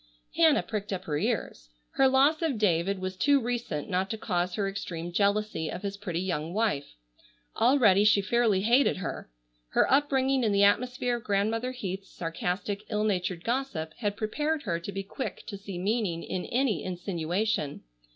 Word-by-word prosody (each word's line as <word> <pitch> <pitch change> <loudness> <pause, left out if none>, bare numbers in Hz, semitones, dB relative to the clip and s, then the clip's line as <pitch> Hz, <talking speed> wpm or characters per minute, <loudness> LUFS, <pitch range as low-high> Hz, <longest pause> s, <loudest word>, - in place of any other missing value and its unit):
Hannah 320 -3 +5
pricked 210 -2 -4
up 185 -1 -3
her 150 -5 -2
ears. - - -2 0.2
Her 270 - +4
loss 275 +5 +4
of 310 -7 0
David 195 -1 +1
was 185 0 -4
too 280 +9 +4
recent 235 - -3
not 190 0 0
to 220 - -3
cause 180 -4 -1
her 200 -2 0
extreme 175 -4 -5
jealousy 200 -4 0
of - - -6
his 200 0 -3
pretty 180 -4 -3
young 170 -2 -3
wife. 210 - -1 0.6
Already 225 -5 +5
she 210 -1 +5
fairly 210 -1 +2
hated 240 +4 +3
her. 185 - -5 0.4
Her - - +2
upbringing 270 -2 +2
in 215 -3 +2
the 200 0 +4
atmosphere 245 +3 +2
of 235 - -11
Grandmother 220 +5 0
Heath's 195 -6 -5
sarcastic, 180 +4 -3
ill 210 -1 0
natured 185 -4 -1
gossip 230 -11 -2
had 205 -3 -1
prepared 295 +8 -1
her 170 -1 -1
to 170 - -6
be 195 0 -4
quick 235 +7 -6
to 220 - -6
see 195 -2 -7
meaning 195 -3 -1
in 180 - -4
any 245 - 0
insinuation. 180 -2 -2
200 Hz, 170 wpm, -28 LUFS, 180-240 Hz, 0.6 s, Hannah